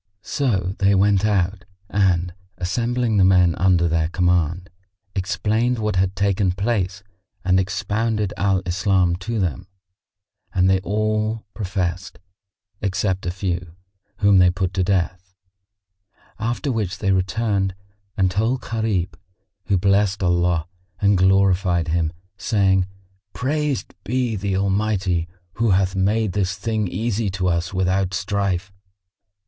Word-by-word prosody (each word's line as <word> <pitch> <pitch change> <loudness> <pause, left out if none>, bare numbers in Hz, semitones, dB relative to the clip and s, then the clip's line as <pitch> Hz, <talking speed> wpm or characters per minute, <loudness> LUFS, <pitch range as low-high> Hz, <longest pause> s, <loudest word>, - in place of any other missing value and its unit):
So 95 -10 -1
they 100 0 +4
went 100 +1 +3
out 95 -2 0 0.2
and, 90 -4 +1 0.2
assembling 115 +4 0
the 95 - +5
men 90 -2 +5
under 90 -2 +3
their 80 -1 +1
command, 90 0 0 0.4
explained 110 +6 0
what 105 -2 -1
had 95 +1 +1
taken 100 -1 +1
place 100 -1 -1 0.4
and 95 0 +4
expounded 105 +2 -1
Al 95 0 +1
Islam 90 -1 +2
to 110 +5 -3
them 85 -10 -2 0.9
and 90 0 +3
they 95 0 +3
all 110 +2 -1
professed, 95 -3 -3 0.6
except 95 -1 -1
a - - +1
few, 90 -2 -3 0.4
whom 100 -2 +5
they 90 0 +6
put 90 0 -2
to 95 - +1
death; 95 0 -1 1.0
after 120 +6 -1
which 105 -5 -2
they 100 -2 0
returned 95 0 0 0.4
and 95 -2 +2
told 115 +7 0
Gharib, 105 -6 -1 0.5
who 100 - +2
blessed 100 +1 +2
Allah 85 -2 +1 0.3
and 100 -1 +3
glorified 95 -2 +3
Him, 80 -1 0 0.3
saying, 95 -4 +2 0.5
"Praised 145 +1 -2
be 120 +2 -1
the 100 -1 -1
Almighty 95 -3 0 0.3
who 115 - +3
hath 95 0 +2
made 100 +1 +1
this 95 -2 0
thing 105 +1 -1
easy 110 +3 -1
to 95 0 -2
us 85 0 -1
without 95 0 0
strife!" 95 0 -1
95 Hz, 125 wpm, -22 LUFS, 90-105 Hz, 1.0 s, they